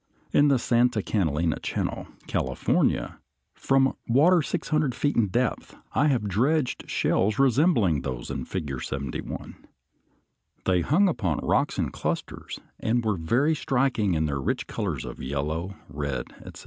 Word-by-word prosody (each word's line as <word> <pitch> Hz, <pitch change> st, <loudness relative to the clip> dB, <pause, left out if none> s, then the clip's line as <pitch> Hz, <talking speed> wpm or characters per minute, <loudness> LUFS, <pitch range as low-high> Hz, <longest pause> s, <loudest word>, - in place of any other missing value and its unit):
In 145 Hz, -, +5 dB
the 140 Hz, -2 st, +4 dB
Santa 120 Hz, -2 st, +2 dB
Catalina 80 Hz, -5 st, 0 dB
Channel, -, -, -3 dB, 0.2 s
California, -, -, 0 dB, 0.3 s
from 135 Hz, 0 st, +2 dB
water 160 Hz, +9 st, +5 dB
six 160 Hz, +2 st, -3 dB
hundred 150 Hz, -5 st, +1 dB
feet 145 Hz, +3 st, 0 dB
in 115 Hz, -3 st, +3 dB
depth, 120 Hz, +5 st, -1 dB, 0.2 s
I 145 Hz, -, +3 dB
have 125 Hz, -7 st, +1 dB
dredged 130 Hz, -, 0 dB
shells 105 Hz, +3 st, +1 dB
resembling 130 Hz, -, +3 dB
those 65 Hz, -3 st, -5 dB
in -, -, -4 dB
Figure 75 Hz, -9 st, -4 dB
71. 70 Hz, 0 st, -5 dB, 1.0 s
They 90 Hz, -2 st, +3 dB
hung 180 Hz, -, +3 dB
upon 95 Hz, -, 0 dB
rocks -, -, +1 dB
in -, -, -1 dB
clusters, -, -, -4 dB, 0.2 s
and 115 Hz, +1 st, 0 dB
were 105 Hz, -2 st, +2 dB
very 120 Hz, -, +2 dB
striking 125 Hz, -, +1 dB
in 80 Hz, 0 st, +1 dB
their 70 Hz, -2 st, -2 dB
rich -, -, -1 dB
colors -, -, -3 dB
of -, -, -8 dB
yellow, 75 Hz, +8 st, -3 dB
red, 70 Hz, -1 st, -4 dB
etc. -, -, -10 dB
110 Hz, 145 wpm, -26 LUFS, -, 1.0 s, In